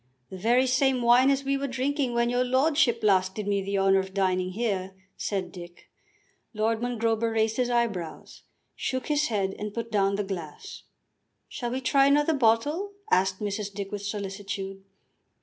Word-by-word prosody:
"The 190 Hz, -, -6 dB
very 240 Hz, +6 st, +3 dB
same 260 Hz, -1 st, +2 dB
wine 245 Hz, +3 st, +6 dB
as 275 Hz, 0 st, +1 dB
we 275 Hz, 0 st, 0 dB
were 280 Hz, 0 st, -2 dB
drinking 265 Hz, 0 st, -1 dB
when 235 Hz, 0 st, +2 dB
your 245 Hz, +1 st, +2 dB
lordship 260 Hz, -1 st, +2 dB
last 190 Hz, -2 st, +3 dB
did 210 Hz, -2 st, -4 dB
me 200 Hz, -1 st, +1 dB
the 200 Hz, +1 st, -2 dB
honour 195 Hz, 0 st, +4 dB
of 190 Hz, 0 st, -5 dB
dining 185 Hz, -1 st, 0 dB
here," 195 Hz, -4 st, -2 dB, 0.2 s
said 190 Hz, -3 st, -3 dB
Dick. 175 Hz, -1 st, -12 dB, 0.6 s
Lord 220 Hz, +1 st, 0 dB
Mongrober 230 Hz, -2 st, 0 dB
raised 220 Hz, 0 st, +1 dB
his 250 Hz, -1 st, +1 dB
eyebrows, 225 Hz, -9 st, -2 dB, 0.3 s
shook 260 Hz, +2 st, -3 dB
his 300 Hz, 0 st, +2 dB
head 195 Hz, -4 st, -1 dB
and 210 Hz, 0 st, -5 dB
put 230 Hz, -1 st, -4 dB
down 200 Hz, -2 st, +2 dB
the 205 Hz, -, -1 dB
glass. 175 Hz, -6 st, -7 dB, 0.6 s
"Shall 240 Hz, -, -4 dB
we 255 Hz, +2 st, -3 dB
try 275 Hz, +1 st, +4 dB
another 295 Hz, +3 st, +3 dB
bottle?" 290 Hz, -, +1 dB, 0.2 s
asked 190 Hz, +1 st, +2 dB
Mrs. 205 Hz, 0 st, -3 dB
Dick 200 Hz, 0 st, -6 dB
with 205 Hz, -1 st, -4 dB
solicitude. 195 Hz, -1 st, -5 dB
220 Hz, 170 wpm, -27 LUFS, 195-255 Hz, 0.6 s, wine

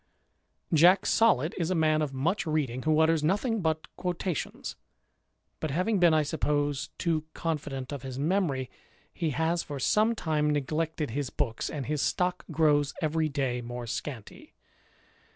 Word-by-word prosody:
Jack 175 Hz, +5 st, +6 dB
Solid 170 Hz, -, +3 dB
is 165 Hz, -1 st, 0 dB
a 185 Hz, -, +1 dB
man 155 Hz, -1 st, +3 dB
of 150 Hz, -3 st, -1 dB
much 160 Hz, +9 st, -1 dB
reading, 140 Hz, -5 st, -1 dB
who 155 Hz, +1 st, +2 dB
utters 160 Hz, -1 st, +3 dB
nothing 205 Hz, +7 st, +1 dB
but 160 Hz, -1 st, -1 dB
quotations: 180 Hz, -2 st, -3 dB, 0.8 s
but 155 Hz, -, -2 dB
having 185 Hz, +8 st, +1 dB
been, 175 Hz, -2 st, +6 dB
I 155 Hz, -1 st, +3 dB
suppose, 145 Hz, -1 st, -1 dB
too 160 Hz, -3 st, 0 dB
confident 145 Hz, -5 st, -3 dB
of 140 Hz, -, -5 dB
his 130 Hz, -1 st, -6 dB
memory, 145 Hz, -5 st, 0 dB, 0.4 s
he 165 Hz, -3 st, -1 dB
has 160 Hz, +4 st, 0 dB
for 145 Hz, -3 st, -6 dB
some 215 Hz, -, +3 dB
time 155 Hz, -6 st, 0 dB
neglected 150 Hz, 0 st, -1 dB
his 140 Hz, +2 st, -2 dB
books, 120 Hz, -6 st, -2 dB
and 145 Hz, -4 st, -4 dB
his 150 Hz, +1 st, -1 dB
stock 180 Hz, 0 st, 0 dB
grows 150 Hz, -2 st, +2 dB
every 155 Hz, 0 st, 0 dB
day 135 Hz, -4 st, -1 dB
more 120 Hz, 0 st, -6 dB
scanty. 115 Hz, 0 st, -7 dB
155 Hz, 150 wpm, -28 LUFS, 140-165 Hz, 0.8 s, Jack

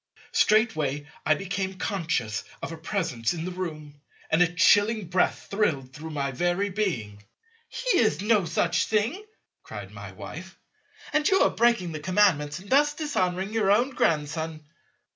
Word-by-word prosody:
Straightway 155 Hz, -, +2 dB, 0.2 s
I 155 Hz, -, +5 dB
became 190 Hz, 0 st, -3 dB
conscious 155 Hz, -, -2 dB, 0.2 s
of -, -, -4 dB
a 165 Hz, -, -6 dB
Presence 160 Hz, -, -2 dB
in 165 Hz, 0 st, -4 dB
the 185 Hz, -, -4 dB
room, 155 Hz, -5 st, -6 dB, 0.3 s
and 160 Hz, +2 st, +4 dB
a 175 Hz, -1 st, +4 dB
chilling 205 Hz, +4 st, +4 dB
breath 180 Hz, +1 st, +1 dB
thrilled 150 Hz, -11 st, 0 dB
through 155 Hz, +4 st, -8 dB
my 140 Hz, -3 st, -2 dB
very 175 Hz, +8 st, 0 dB
being. 120 Hz, -, -2 dB, 0.5 s
"He -, -, 0 dB
is 215 Hz, -10 st, +2 dB
no 210 Hz, -2 st, +2 dB
such 170 Hz, +2 st, +1 dB
thing," 230 Hz, -, 0 dB, 0.4 s
cried -, -, -9 dB
my -, -, -9 dB
Wife, -, -, -9 dB, 0.6 s
"and 305 Hz, 0 st, +3 dB
you 385 Hz, -, +4 dB
are -, -, +3 dB
breaking 235 Hz, -7 st, +2 dB
the 155 Hz, -, -5 dB
Commandments 165 Hz, -3 st, +2 dB
in 195 Hz, -, -14 dB
thus 290 Hz, +2 st, +4 dB
dishonouring 190 Hz, -, -1 dB
your 215 Hz, -3 st, +1 dB
own 240 Hz, +7 st, +3 dB
Grandson." 155 Hz, -, -1 dB
180 Hz, 155 wpm, -26 LUFS, 155-210 Hz, 0.6 s, I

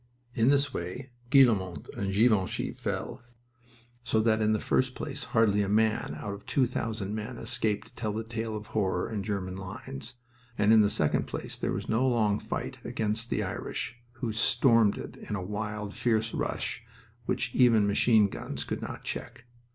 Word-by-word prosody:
In 115 Hz, +2 st, +3 dB
this 140 Hz, 0 st, +3 dB
way 110 Hz, +10 st, -5 dB, 0.2 s
Guillemont 100 Hz, -, +4 dB
and 100 Hz, -1 st, -2 dB
Ginchy 105 Hz, -2 st, +2 dB
fell, -, -, -4 dB, 0.8 s
so 115 Hz, -2 st, +1 dB
that 110 Hz, 0 st, +3 dB
in 110 Hz, 0 st, +3 dB
the 110 Hz, -, +2 dB
first 130 Hz, 0 st, +1 dB
place 140 Hz, -3 st, -5 dB
hardly 110 Hz, -4 st, +3 dB
a 100 Hz, -, -1 dB
man 110 Hz, +1 st, +1 dB
out 100 Hz, -, -4 dB
of 100 Hz, -, -9 dB
two 135 Hz, -, +3 dB
thousand 110 Hz, -4 st, -3 dB
men 110 Hz, +3 st, -4 dB
escaped 110 Hz, -1 st, -1 dB
to -, -, -29 dB
tell 110 Hz, -3 st, -3 dB
the 110 Hz, +2 st, -3 dB
tale 110 Hz, -1 st, -3 dB
of 105 Hz, -, -8 dB
horror 100 Hz, -3 st, +1 dB
in 105 Hz, -2 st, -2 dB
German 95 Hz, -3 st, -3 dB
lines, 115 Hz, +6 st, -6 dB, 0.4 s
and 105 Hz, +2 st, +5 dB
in 110 Hz, -, +8 dB
the 105 Hz, -, +4 dB
second 75 Hz, -7 st, +1 dB
place -, -, -5 dB
there -, -, -2 dB
was -, -, -3 dB
no 120 Hz, +4 st, +2 dB
long 110 Hz, -4 st, +2 dB
fight -, -, -4 dB
against 110 Hz, +2 st, -2 dB
the 105 Hz, -, 0 dB
Irish, 120 Hz, +4 st, -4 dB
who 120 Hz, -3 st, -3 dB
stormed 115 Hz, -1 st, +4 dB
it -, -, -8 dB
in 105 Hz, -, -1 dB
a 95 Hz, -, -3 dB
wild, 105 Hz, +1 st, -4 dB
fierce 110 Hz, -2 st, +1 dB
rush -, -, -2 dB, 0.4 s
which -, -, -1 dB
even 115 Hz, -5 st, +5 dB
machine 105 Hz, +1 st, +4 dB
guns -, -, -5 dB
could -, -, -4 dB
not -, -, -6 dB
check. 115 Hz, -, -6 dB
110 Hz, 180 wpm, -29 LUFS, 105-120 Hz, 0.8 s, in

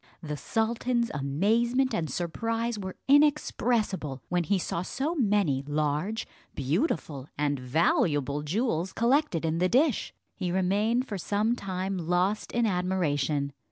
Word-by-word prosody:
The 150 Hz, -1 st, -3 dB
sultan's 235 Hz, -, 0 dB
amazement 225 Hz, -, +1 dB
and 165 Hz, -7 st, -1 dB
surprise 225 Hz, -, -2 dB
were 190 Hz, -2 st, -5 dB
inexpressible, 235 Hz, -, +2 dB
when 175 Hz, -1 st, +1 dB
he 200 Hz, +2 st, +2 dB
saw 170 Hz, -1 st, -2 dB
so 270 Hz, -, -2 dB
many 205 Hz, -, +2 dB
large, 150 Hz, +9 st, -1 dB, 0.3 s
beautiful 145 Hz, -, -1 dB
and 145 Hz, -1 st, 0 dB
valuable 145 Hz, +1 st, +1 dB
jewels 185 Hz, -, -1 dB
collected 235 Hz, -, +2 dB
in 160 Hz, +1 st, 0 dB
the 180 Hz, +1 st, +2 dB
dish. 270 Hz, -, +2 dB, 0.2 s
He 180 Hz, -3 st, -3 dB
remained 205 Hz, +7 st, +1 dB
for 200 Hz, -3 st, -4 dB
some 210 Hz, +6 st, +1 dB
time 190 Hz, -2 st, -3 dB
lost 180 Hz, +5 st, 0 dB
in 235 Hz, -1 st, +1 dB
admiration. 155 Hz, -7 st, 0 dB
190 Hz, 125 wpm, -28 LUFS, 155-230 Hz, 0.3 s, inexpressible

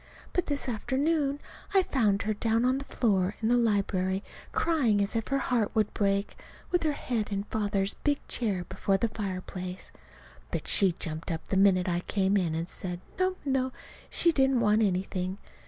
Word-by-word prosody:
But 360 Hz, -, 0 dB
this 285 Hz, -2 st, -2 dB
afternoon 280 Hz, +5 st, 0 dB, 0.4 s
I 385 Hz, -, +6 dB
found 215 Hz, -, +1 dB
her 215 Hz, +1 st, 0 dB
down 225 Hz, +2 st, +1 dB
on 260 Hz, +2 st, +2 dB
the 275 Hz, -, -7 dB
floor 200 Hz, -7 st, +1 dB
in 225 Hz, -, 0 dB
the 245 Hz, -, +5 dB
library 200 Hz, -4 st, +1 dB, 0.3 s
crying 275 Hz, -11 st, +2 dB
as 200 Hz, +3 st, 0 dB
if 225 Hz, -1 st, -1 dB
her 275 Hz, -, +1 dB
heart 245 Hz, -5 st, 0 dB
would 215 Hz, -2 st, +1 dB
break 200 Hz, 0 st, 0 dB, 0.4 s
with 355 Hz, -, +2 dB
her 310 Hz, -2 st, +1 dB
head 230 Hz, -6 st, -2 dB
in 200 Hz, 0 st, -1 dB
Father's 205 Hz, -2 st, -1 dB
big 290 Hz, -1 st, -1 dB
chair 200 Hz, -7 st, -1 dB
before 195 Hz, -1 st, 0 dB
the 230 Hz, +4 st, 0 dB
fireplace. 185 Hz, -3 st, -5 dB, 0.6 s
But -, -, -3 dB
she 190 Hz, -3 st, +4 dB
jumped 160 Hz, 0 st, -4 dB
up 160 Hz, -2 st, -4 dB
the -, -, 0 dB
minute 190 Hz, -1 st, +4 dB
I 175 Hz, -1 st, +1 dB
came 195 Hz, +2 st, +1 dB
in 175 Hz, -5 st, +1 dB
and 165 Hz, +1 st, -2 dB
said, 180 Hz, -1 st, -3 dB, 0.2 s
no, 370 Hz, 0 st, +2 dB
no, 265 Hz, -1 st, +1 dB, 0.4 s
she 340 Hz, -, +4 dB
didn't 270 Hz, -4 st, +3 dB
want 215 Hz, -1 st, +3 dB
anything. 185 Hz, -1 st, -1 dB
210 Hz, 180 wpm, -29 LUFS, 190-260 Hz, 0.6 s, I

